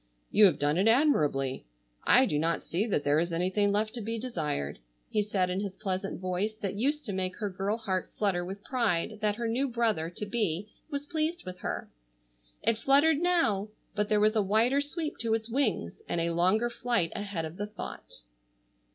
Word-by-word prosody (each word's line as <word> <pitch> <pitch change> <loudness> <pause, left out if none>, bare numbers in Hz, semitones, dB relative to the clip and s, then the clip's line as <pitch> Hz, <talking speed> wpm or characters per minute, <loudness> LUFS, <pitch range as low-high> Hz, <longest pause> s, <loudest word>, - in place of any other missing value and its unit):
"You 210 - +7
have 175 -7 +4
done 145 +4 +1
it 200 - +3
admirably. 150 - +2 0.4
I 255 +2 +6
do 150 -11 0
not 165 +2 0
see 195 +7 -1
that 185 -9 0
there 145 +1 +3
is 170 +1 -1
anything 185 +4 +1
left 215 +2 0
to 240 - -4
be 225 +2 -3
desired," 155 - -3 0.3
he 210 - +2
said 195 -3 0
in 185 - -1
his 200 -2 -4
pleasant 190 -1 -3
voice 185 +4 -1
that 200 -3 -3
used 280 +8 0
to 205 - -3
make 185 -1 -2
her 205 -3 -3
girl 195 +4 -1
heart 190 -5 -2
flutter 195 -4 +1
with 195 +3 -7
pride 220 -5 0
that 210 -1 +1
her 235 +1 -2
new 250 +5 +1
brother 225 -9 0
to 180 +4 -6
be 205 -3 -1 0.2
was 285 -1 -3
pleased 320 +1 -2
with 185 0 -7
her. - - -4 0.8
It 230 -1 +2
fluttered 285 +4 +4
now, 330 - +2 0.3
but 210 0 -1
there 210 - +3
was 215 +1 +3
a 215 - +4
wider 225 +8 +3
sweep 305 +2 -4
to 225 -1 +1
its 225 +1 -4
wings, 225 - 0
and 170 - 0
a 170 0 0
longer 190 +8 +2
flight 240 -8 0
ahead 200 -5 -3
of 160 +3 -8
the 205 +1 -3
thought. 210 - -8
210 Hz, 200 wpm, -29 LUFS, 180-235 Hz, 0.8 s, You